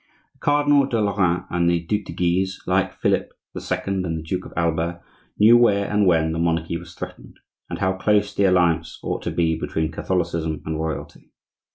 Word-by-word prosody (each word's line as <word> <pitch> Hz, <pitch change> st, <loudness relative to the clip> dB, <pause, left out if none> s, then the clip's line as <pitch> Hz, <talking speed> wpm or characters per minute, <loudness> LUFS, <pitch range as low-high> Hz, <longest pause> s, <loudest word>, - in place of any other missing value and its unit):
The -, -, -33 dB
Cardinal 145 Hz, -1 st, +3 dB
de 120 Hz, -4 st, -1 dB
Lorraine 95 Hz, -4 st, +1 dB
and 85 Hz, 0 st, +2 dB
the 85 Hz, 0 st, +2 dB
Duc 105 Hz, +5 st, -2 dB
de -, -, -7 dB
Guise, 95 Hz, +2 st, 0 dB
like 95 Hz, +1 st, +1 dB
Philip -, -, +1 dB, 0.2 s
the -, -, -6 dB
Second 95 Hz, -1 st, -2 dB
and 80 Hz, -2 st, -2 dB
the 80 Hz, -, -6 dB
Duke 80 Hz, -, -4 dB
of -, -, -14 dB
Alba, 85 Hz, +1 st, 0 dB, 0.4 s
knew 110 Hz, +3 st, +7 dB
where 100 Hz, -4 st, +3 dB
and 105 Hz, -1 st, +3 dB
when 80 Hz, -2 st, +3 dB
the 80 Hz, -, -3 dB
monarchy 85 Hz, 0 st, 0 dB
was 85 Hz, -, -8 dB
threatened, -, -, -9 dB, 0.3 s
and -, -, -4 dB
how 95 Hz, 0 st, +1 dB
close 105 Hz, +1 st, +1 dB
the 100 Hz, -, +2 dB
alliance 90 Hz, -3 st, +2 dB
ought -, -, -3 dB
to -, -, -3 dB
be 80 Hz, -1 st, +1 dB
between 80 Hz, 0 st, -2 dB
Catholicism 80 Hz, -3 st, -2 dB
and 80 Hz, 0 st, -3 dB
Royalty. 80 Hz, -1 st, -5 dB
90 Hz, 195 wpm, -22 LUFS, 80-100 Hz, 0.4 s, knew